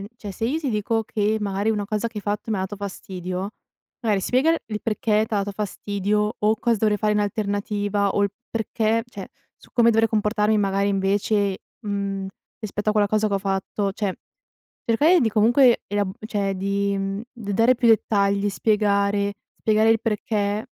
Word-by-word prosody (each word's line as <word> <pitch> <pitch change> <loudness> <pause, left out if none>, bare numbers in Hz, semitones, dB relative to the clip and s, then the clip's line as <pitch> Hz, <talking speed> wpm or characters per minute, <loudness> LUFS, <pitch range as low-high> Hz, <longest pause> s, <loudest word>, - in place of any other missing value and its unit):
n 195 - -7
cioè, 205 -4 -7
se 225 +4 -2
io 300 +6 0
ti 285 -6 -2
dico 220 +1 0
che 215 +1 0
magari 200 0 -1
una 210 -2 0
cosa 215 +2 -2
che 225 - -18
hai 210 - -4
fatto 205 +2 -3
mi 215 - +1
ha - - -2
dato 190 +2 -4
fastidio, 185 -1 -5 0.5
magari 210 -5 +1
spiega 260 +9 +2
il 330 - 0
il 210 -1 -4
perché 215 0 +1
t'ha 220 - -2
dato 200 0 -1
fastidio 210 +1 -1
o 215 +1 +2
cosa 235 -2 +2
dovrei 210 -1 +2
fare 210 +1 +1
in 210 - +1
alternativa, 205 -1 -1
o 200 - +1
il 200 - +1 0.2
perché 225 0 0
cioè, 200 -5 -9 0.3
su - - -21
come 235 -1 +4
dovrei 225 0 +3
comportarmi 210 0 +1
magari 200 0 +1
invece, 200 0 +1 0.2
mhmm, 200 -2 -3 0.3
rispetto 210 -1 -3
a 215 - +4
quella 210 -1 +3
cosa 215 0 +1
che 200 - -1
ho - - +2
fatto. 195 0 -2
Cioè, 200 -2 -2 0.7
cercare 305 +10 +4
di 235 - +2
comunque 235 +4 +4
ela 205 0 0 0.2
cioè, 200 -3 -1
di, 200 +1 0
mhmm, 195 +1 -3
d 215 -5 -6
dare 230 +5 +4
più 235 -1 +3
dettagli, 200 -2 +2
spiegare 200 -1 +1 0.3
spiegare 220 0 +3
il 225 -1 +4
perché 210 -1 -1
210 Hz, 190 wpm, -23 LUFS, 200-220 Hz, 0.7 s, come